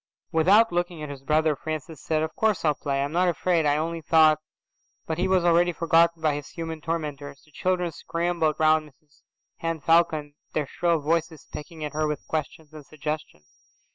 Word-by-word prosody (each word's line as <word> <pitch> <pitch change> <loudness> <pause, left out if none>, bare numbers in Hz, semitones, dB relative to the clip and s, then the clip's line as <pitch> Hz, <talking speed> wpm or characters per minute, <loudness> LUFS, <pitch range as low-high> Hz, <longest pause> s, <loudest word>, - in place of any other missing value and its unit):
Without 195 +8 +5
looking 175 -2 -2
at 150 - -6
his 140 -2 -9
brother, 155 +2 +2
Francis 155 +1 -6
said, 155 -1 0
"Of 160 - -4
course 220 -5 +1
I'll 150 - +4
play. 140 -1 -2
I'm 140 - -3
not 180 +3 +2
afraid, 170 -2 +1
I 145 0 +3
only 165 +1 -2
thought 155 -1 +5
Â…" - - -49 0.6
But 160 +1 -3
he 185 - +2
was 185 -2 +2
already 175 +1 +4
forgotten 165 0 +3
by 155 -2 +3
his 145 -1 -6
human 165 -2 -6
tormentors. 145 -3 -4
The 155 - -24
children 180 +2 -1
scrambled 165 0 -1
round 155 -1 +3
Mrs 145 0 -31 0.4
Henne 165 -1 -3
Falcon, 155 -2 +2 0.2
their 150 - 0
shrill 170 +4 0
voices 160 +1 -1
pecking 155 +1 -8
at 150 -1 -4
her 155 0 0
with 150 -2 -4
questions 155 0 -5
and 155 -1 -10
suggestions. 150 - -6
160 Hz, 190 wpm, -25 LUFS, 150-170 Hz, 0.6 s, Without